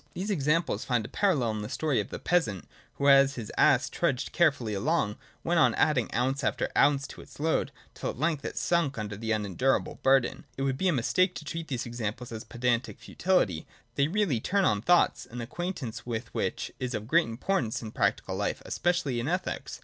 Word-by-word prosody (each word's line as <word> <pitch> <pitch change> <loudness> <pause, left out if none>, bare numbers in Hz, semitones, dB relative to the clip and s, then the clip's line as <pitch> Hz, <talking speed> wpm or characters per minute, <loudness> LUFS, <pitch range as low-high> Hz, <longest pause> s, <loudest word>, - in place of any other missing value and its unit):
These 195 +4 -2
examples 160 -1 +1
find 120 -4 0
a - - -5
parallel 150 - +1
in 110 -1 -4
the 105 - -5
story 155 -4 0
of - - -3
the - - -5
peasant 165 - 0 0.3
who, 140 - 0
as 140 0 +6
his 115 -4 -6
ass 135 +1 +4
trudged 140 -7 -1
cheerfully 140 -10 +2
along, 105 0 0 0.3
went 170 0 +2
on - - +4
adding 150 -7 +2
ounce 130 +4 0
after - - 0
ounce 140 -1 +4
to - - -10
its - - -15
load, 160 +2 0 0.2
till - - -4
at - - -6
length 155 0 0
it - - -5
sunk 140 +1 +1
under 105 -2 -4
the 110 +2 -3
unendurable 110 +5 0
burden. 135 -2 +2
It 135 - -2
would 135 -1 -1
be 190 - +1
a - - +4
mistake 180 +7 +2
to 150 - -7
treat 165 +2 -5
these 125 -4 -3
examples 120 0 -4
as 110 -1 -6
pedantic 120 +2 -1
futility; 135 - 0 0.3
they 140 - +2
really 180 - +1
turn 195 - +1
on 105 -1 +2
thoughts, 175 +8 +3
an 120 - -8
acquaint 175 +7 -4
ance 120 0 -6
with 115 -2 -5
which - - -2
is 125 -1 -3
of 105 - -4
great 165 +3 +3
importance 115 - -1
in 110 - -6
practical 100 -5 0
life, 100 +1 -2
especially 175 -8 0
in 120 - -2
ethics. 180 +3 -3
135 Hz, 205 wpm, -28 LUFS, 115-165 Hz, 0.3 s, as